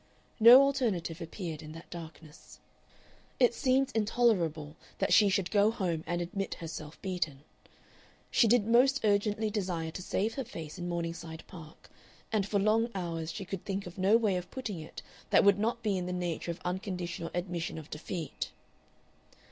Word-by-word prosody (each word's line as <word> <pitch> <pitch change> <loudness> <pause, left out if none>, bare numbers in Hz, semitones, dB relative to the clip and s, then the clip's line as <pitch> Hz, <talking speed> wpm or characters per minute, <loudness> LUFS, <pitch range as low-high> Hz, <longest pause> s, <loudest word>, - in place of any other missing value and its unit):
No 240 +4 +10
alternative 215 - 0
appeared 165 -2 -5
in 155 0 -9
that 165 +1 -12
darkness. 165 -2 -11 0.8
It 245 -2 +5
seemed 265 +2 +2
intolerable 190 -9 +1 0.2
that - - +1
she 210 -2 +6
should 190 -2 0
go 205 0 +4
home 180 -8 -2
and 175 0 -1
admit 195 +3 -4
herself 160 -2 -8
beaten. 165 -7 -3 0.9
She 230 - +5
did 225 -1 +4
most 255 +4 +4
urgently 210 +1 +1
desire 180 -6 -2
to 185 - -6
save 210 +4 -1
her 270 - -3
face 165 -6 -8
in 175 0 -3
Morningside 165 -1 -4
Park, 165 -4 -13 0.4
and 210 -3 +1
for 205 - 0
long 215 +3 +3
hours 165 -3 -3
she 195 - -6
could 190 -1 -5
think 195 0 -3
of 175 +2 -9
no 195 +4 +5
way 210 -5 +1
of 180 - -6
putting 225 -9 -5
it 155 - -9 0.3
that - - +5
would 200 -1 +5
not 230 +2 -1
be 200 -4 +1
in 180 - -4
the 180 - -3
nature 175 -2 -3
of 170 - -4
unconditional 180 -2 -3
admission 175 -2 -3
of 155 -2 -9
defeat. 160 0 -5
185 Hz, 170 wpm, -31 LUFS, 165-215 Hz, 0.9 s, No